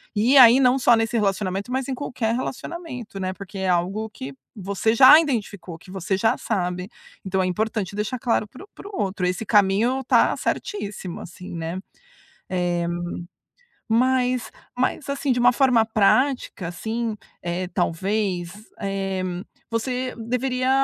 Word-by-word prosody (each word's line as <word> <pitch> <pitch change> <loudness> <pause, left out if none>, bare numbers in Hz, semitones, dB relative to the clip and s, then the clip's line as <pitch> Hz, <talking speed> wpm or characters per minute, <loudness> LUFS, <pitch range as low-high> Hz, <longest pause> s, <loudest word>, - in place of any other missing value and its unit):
e 240 +7 +4
aí 245 0 +9
não 255 -1 +4
só 245 -2 +5
nesse 225 +1 0
relacionamento, 195 +1 -1
mas 260 +1 -1
em 265 - -2
qualquer 245 -4 -2
relacionamento, 255 - -6
né, 185 0 -2
porque 195 +1 -10
é 190 -1 -1
algo 185 +5 0
que 140 -10 -7 0.2
você 200 +3 0
já 260 +5 +9
identificou, 205 - -3
que 180 - -17
você 190 +1 -2
já 220 +3 +2
sabe, 180 -3 -2 0.4
então 190 0 0
é - - +1
importante 200 +1 -2
deixar 215 +5 -2
claro 230 -3 +1
para 255 - -13
o - - -34
para - - -10
o 405 - -3
outro, 190 -2 -1
esse 180 +5 -1
caminho 210 +6 +3
tá - - +3
certíssimo 205 - -4
assim, 180 0 -9
né. 165 +2 -4 0.7
Eh, 175 -2 0 1.0
mas 250 +1 +2 0.3
mas 255 +3 -1
assim 280 -1 -1
de 245 - +1
uma 245 +1 +6
forma 250 -3 +4
prática 225 -2 +1
assim, 220 +6 -3 0.3
eh, 175 +1 -3
talvez, 185 0 -1 0.3
eh, 195 -1 -2 0.5
você 250 +2 -2
deveria 250 +2 -1
215 Hz, 150 wpm, -23 LUFS, 190-250 Hz, 1.0 s, aí